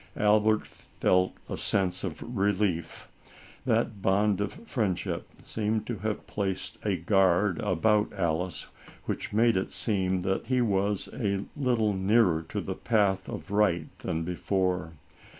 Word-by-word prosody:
Albert 105 +1 +3
felt 90 0 0
a - - -3
sense 95 -2 0
of 90 -6 -4
relief. 95 -5 0 0.6
That 100 -3 +1
bond 100 +1 +2
of 100 - -2
friendship 95 - -1 0.2
seemed 110 0 -1
to 120 -3 -4
have 110 +1 -3
placed 95 -2 -3
a 100 -3 +1
guard 95 +1 +3
about 105 +2 +2
Alice, 85 -2 -1 0.4
which - - -3
made 115 +2 +4
it 95 - -1
seem 95 -4 0
that 95 +4 -1
he 130 0 +2
was 100 -3 +1
a 100 -4 -1
little 120 -7 +1
nearer 95 -3 +3
to - - -2
the - - -3
path 100 -4 +1
of 100 - -7
right 95 -6 +1
than 80 +1 -2
before. 90 -1 -1
100 Hz, 135 wpm, -28 LUFS, 90-105 Hz, 0.6 s, made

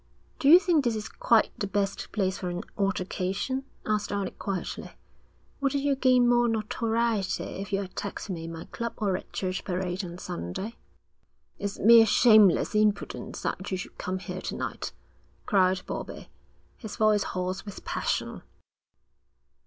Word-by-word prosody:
'Do 275 - +3
you 335 - +11
think 350 -6 +2
this 235 -3 +1
is 215 0 -4
quite 225 0 +3
the 205 - -1
best 200 0 -2
place 190 -3 -1
for 180 - -3
an 175 0 -4
altercation?' 195 +6 -1 0.2
asked 210 -1 0
Alec 200 -2 -3
quietly. 195 -3 -4 0.7
'Wouldn't 275 0 0
you 285 -1 +2
gain 255 -2 +4
more 240 0 +4
notoriety 225 -1 0
if 195 0 -6
you 195 0 +1
attacked 195 +2 -6
me 170 -4 -4
in 165 - -6
my 165 0 -7
club 235 0 -5
or 200 -4 0
at - - -7
Church 185 -1 -3
Parade 185 0 -2
on 175 -1 -7
Sunday?' 180 - -5 0.8
'It's 200 0 -3
mere 225 +1 +7
shameless 215 -4 +6
impudence 210 -1 0
that 190 - -3
you 185 - -1
should 185 - -8
come 185 +1 -2
here 185 0 -6
to - - -4
night,' - - -4 0.5
cried 185 -2 +2
Bobbie, - - -6 0.5
his 220 -4 -7
voice 215 -1 +3
hoarse 185 0 -3
with 205 - -9
passion. - - -2
205 Hz, 155 wpm, -27 LUFS, 185-230 Hz, 0.8 s, you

